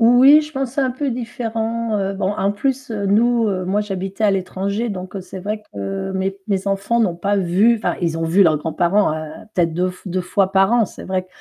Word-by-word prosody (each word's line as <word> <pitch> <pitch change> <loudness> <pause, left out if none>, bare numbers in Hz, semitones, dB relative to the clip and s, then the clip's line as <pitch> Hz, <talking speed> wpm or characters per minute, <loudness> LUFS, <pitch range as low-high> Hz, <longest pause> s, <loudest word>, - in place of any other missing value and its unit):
Oui, 255 +6 +7
je 305 +1 -10
pense 270 -3 -2
c'est - - +1
un 260 -2 +1
peu 275 +1 -2
différent, 230 -2 -2
heu, 195 0 -1
bon 190 0 -1
en 200 -1 0
plus, 270 +3 -2
heu, 200 -2 -2
nous 230 +2 +3 0.2
moi 200 +3 +1
j'habitais 195 0 -4
à 210 - +5
l'étranger 195 +4 -2
donc 185 0 -6
c'est 185 +1 -9
vrai 210 +3 -3
que 100 - -4
mes 190 +1 -2
mes 200 -1 -1
enfants 200 +4 0
n'ont 180 -7 +1
pas 200 +3 0
vu, 195 +5 +3
enfin - - -1
ils 165 -2 0
ont 165 - -2
vu 170 +5 +4
leurs 155 -3 +3
grands-parents 170 +4 +1 0.4
peut-être 170 -3 +1
deu 180 +1 0 0.2
deux 185 +1 -1
fois 190 +2 0
par 195 +2 +4
an, 240 -2 +4
c'est - - -10
vrai 185 -1 -2
200 Hz, 215 wpm, -20 LUFS, 185-230 Hz, 0.4 s, Oui